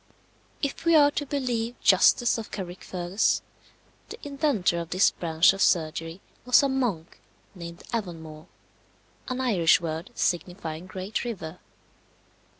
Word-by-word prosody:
If 280 - -3
we 335 -1 +4
are 290 -2 +6
to 290 0 -3
believe 245 -4 -2
Justus 230 +5 +4
of 220 - -7
Carrickfergus, 180 +1 -2 0.7
the 445 - -8
inventor 275 - 0
of 170 -1 -6
this 185 +2 +3
branch 165 +1 +3
of 195 - -5
surgery 165 +1 0 0.2
was 250 +3 +5
a 280 - +2
monk 235 -12 -2 0.3
named 170 -2 -9
Avonmore 165 -7 -5 0.8
an 255 0 -3
Irish 200 -11 +3
word 160 0 -5
signifying 175 -1 -2
Great 190 +3 -4
River. 180 -8 -6
185 Hz, 125 wpm, -26 LUFS, 170-245 Hz, 0.8 s, are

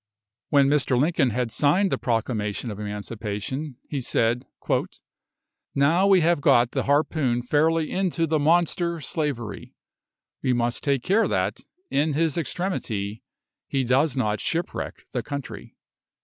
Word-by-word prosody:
When 140 -2 +5
Mr. 140 -3 +2
Lincoln 150 -2 +2
had 120 +1 -2
signed 180 - +2
the - - +1
Proclamation 115 -1 -1
of 105 - -7
Emancipation, 105 +6 -4
he 140 -3 -3
said, 120 +1 0 1.3
"Now 165 +8 +4
we 190 -2 +6
have 170 -2 +2
got 120 -3 +4
the - - -1
harpoon 140 -4 +1
fairly 155 +4 +2
into 180 -3 0
the 155 -1 +1
monster 170 +2 +2
slavery, 145 -8 -4 0.7
we 130 - +1
must 120 0 -1
take 140 -4 +1
care 210 +5 +3
that, - - -1 0.3
in 150 +2 +1
his 160 0 +1
extremity, 115 - -3 0.5
he 135 -1 0
does 135 +3 +2
not 110 -4 0
shipwreck 170 +1 -3
the 125 - -1
country." 140 +2 -7
140 Hz, 135 wpm, -25 LUFS, 120-160 Hz, 1.3 s, we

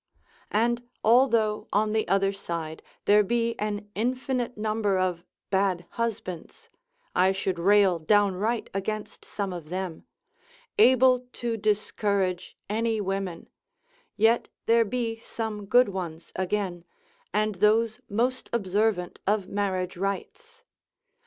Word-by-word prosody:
And 240 +3 0
although 225 -3 +3
on 210 +1 +2
the 220 0 +1
other 195 0 +2
side 165 -5 -5 0.2
there 210 +1 +6
be 230 +2 0
an 210 0 -3
infinite 250 +1 -1
number 215 -2 0
of 180 -2 0 0.3
bad 190 -3 +1
husbands 205 -7 -5 0.5
(I 185 +1 +4
should 190 -2 -2
rail 195 -1 +4
downright 205 +5 +1
against 210 +2 -4
some 200 -3 -4
of 165 -3 -8
them), 185 -2 -5 0.7
able 255 - +5
to 235 -1 -2
discourage 200 -3 -1
any 225 +1 0
women; 195 -3 -3 0.7
yet 225 +3 +3 0.2
there 230 0 +4
be 225 +1 -2
some 220 -3 -5
good 245 +2 +5
ones 175 -4 -6
again, 185 -2 -2 0.5
and 215 0 +1
those 220 +1 +3
most 245 +5 -1
observant 205 -3 0
of 205 -2 +1
marriage 185 -3 -2
rites. 195 +1 -5
210 Hz, 115 wpm, -27 LUFS, 190-225 Hz, 0.7 s, there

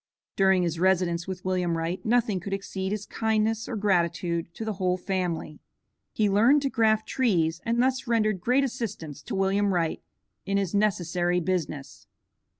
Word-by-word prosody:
During 190 -2 +4
his 170 -1 -2
residence 180 -2 +1
with 185 -1 -6
William 180 -3 0
Wright, 170 +3 -3
nothing 225 -4 +1
could 195 +3 -5
exceed 195 -1 -3
his 210 -1 -3
kindness 220 0 0
or 240 - -3
gratitude 170 -4 0
to 220 - -5
the 220 - -2
whole 180 0 +2
family. 180 -5 -3 0.5
He 215 - +1
learned 235 +9 +4
to 275 - 0
graft 220 -3 +2
trees, 170 -10 +1
and 230 +1 0
thus 260 0 0
rendered 215 -5 +1
great 255 +7 +2
assistance 220 - -5
to - - -5
William 195 +1 +1
Wright 165 -2 -1 0.4
in 195 +1 -1
his 195 -4 -1
necessary 180 -3 +1
business. 165 -5 -3
190 Hz, 160 wpm, -26 LUFS, 175-220 Hz, 0.5 s, During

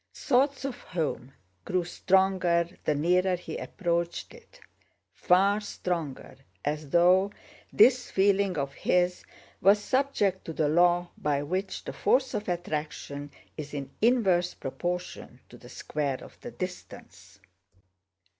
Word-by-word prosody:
Thoughts 275 +1 +1
of 270 - -4
home 155 -6 -3 0.3
grew 180 -1 0
stronger 180 -1 +2 0.2
the 150 - +2
nearer 180 +5 +2
he 180 - -7
approached 170 -2 -2
it—far 210 - -1
stronger, 170 -8 -4 0.3
as 150 0 -2
though 180 +5 +4 0.4
this 250 -1 +5
feeling 195 -2 +2
of 140 -1 -2
his 180 +3 +1 0.4
was 200 +3 +6
subject 210 -5 0
to 165 - -5
the 155 -1 +1
law 175 +2 +3
by 145 -1 0
which 185 +6 -3
the - - -6
force 260 +1 +1
of 205 - -3
attraction 150 -4 -4 0.3
is 150 -1 -6
in 140 -1 -5
inverse 195 -7 +3
proportion 175 +6 -5
to - - -13
the - - -14
square 140 -3 -3
of - - -13
the - - -7
distance. 185 -5 -9
180 Hz, 125 wpm, -28 LUFS, 155-200 Hz, 0.4 s, was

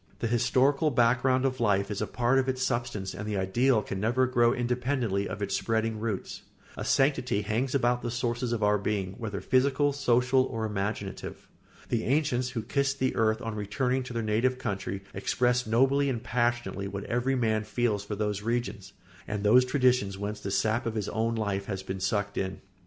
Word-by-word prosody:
The - - -3
historical 130 +6 +2
background 125 +1 +3
of 130 -1 -1
life 100 -3 +1
is 105 - -3
a 105 - -1
part 120 +6 +2
of 130 0 0
its 130 0 -1
substance 120 -6 -2
and 105 +3 -6
the 105 -1 -1
ideal 110 +5 +2
can 95 - -5
never 120 +5 +2
grow 120 -2 +3
independently 120 -4 -1
of 100 +2 -4
its 100 0 -1
spreading 110 +1 -1
roots. 110 -4 -4 0.3
A - - -5
sanctity 130 -6 +1
hangs 120 +6 -1
about 120 -2 +2
the 120 - -3
sources 120 0 -2
of 115 -3 -1
our 105 0 +3
being, 100 -2 -2
whether 105 -4 -4
physical, 140 +2 +2
social, 125 -1 +3
or 115 -3 -3
imaginative. 100 -1 -4 0.4
The 115 -2 0
ancients 130 -2 +1
who 120 -3 -4
kissed 140 +3 0
the 130 -1 0
earth 110 0 +1
on 115 -1 -3
returning 110 +5 -1
to 125 -1 -7
their 115 -1 -2
native 115 +4 +1
country 100 -5 -4
expressed 125 -1 +1
nobly 135 +5 +3
and 120 -2 -3
passionately 120 -5 -1
what 100 0 -5
every 125 +3 0
man 110 -3 +1
feels 110 -1 -1
for 105 0 -5
those 105 -1 -2
regions 110 -4 -3 0.3
and 105 0 -3
those 125 +5 +6
traditions 125 -7 +2
whence 105 +1 -4
the 100 - -5
sap 110 +4 0
of 115 - -3
his 105 -2 -2
own 115 +1 0
life 100 -3 -2
has 95 -2 -4
been 95 0 -5
sucked 100 +1 -1
in. 95 0 -3
115 Hz, 190 wpm, -28 LUFS, 105-125 Hz, 0.4 s, those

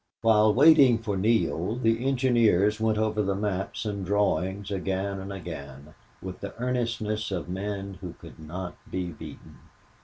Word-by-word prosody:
While 110 -1 +5
waiting 135 -3 +7
for 110 -3 -3
Neale 105 -1 +1
the 115 -1 +1
engineers 115 -6 +3
went 110 -1 +1
over 110 0 +1
the 100 -1 0
maps 100 0 -3
and 100 -2 -3
drawings 100 0 0
again 95 0 -2
and 95 +1 -7
again, 75 -6 -8 0.3
with 95 -1 -6
the 100 - -7
earnestness 115 -3 -2
of 90 -4 -3
men 95 +1 -5
who 90 -3 -6
could - - -14
not 90 +3 -6
be 90 -1 -3
beaten. 75 - -11
100 Hz, 150 wpm, -27 LUFS, 95-110 Hz, 0.3 s, waiting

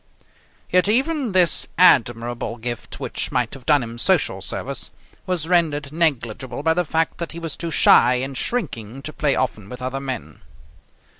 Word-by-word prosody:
Yet 180 +2 +3
even 265 +2 +1
this 180 -4 +2
admirable 120 -7 +3
gift, 120 0 -5
which - - -2
might 125 -2 0
have 135 -3 -11
done 145 -4 +4
him 115 0 -7
social - - +1
service, - - -3 0.4
was 175 -4 -1
rendered 155 -5 +1
negligible 130 -5 -1
by 160 +1 +3
the 180 +2 +1
fact 160 +2 -1
that 170 -1 -4
he 170 - -7
was 165 -3 -4
too 170 - -5
shy 125 -5 +5
and 135 +2 -3
shrinking 135 - -3
to 155 - -6
play 145 -2 +1
often 110 -6 -2
with 125 - -8
other 130 +1 -3
men. 130 -4 -6
140 Hz, 165 wpm, -22 LUFS, 120-170 Hz, 0.4 s, shy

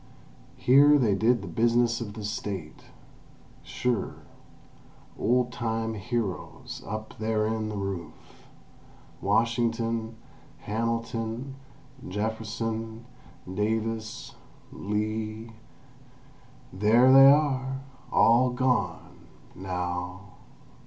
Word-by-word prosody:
Here 145 +3 +6
they 115 -7 +3
did 110 +2 +2
the - - -7
business 120 0 +2
of 105 -2 -6
the 110 - -7
State—sure; 100 +3 -5 1.0
old 125 0 +1
time 115 -2 -2
heroes 110 -2 -4
up 110 +1 -6
therein 110 0 0
the 105 - -4
roof—Washington, 115 +4 -3 0.5
Hamilton, 115 +3 -3 0.5
Jefferson, 110 +2 -3 0.4
Davis, 110 +3 -3 0.4
Lee 110 +2 -3 1.2
—there 115 +7 +5
they 135 0 +10
are! 135 -2 +2 0.3
All 120 +3 +5
gone—now! 90 -6 -3
110 Hz, 70 wpm, -27 LUFS, 105-120 Hz, 1.2 s, they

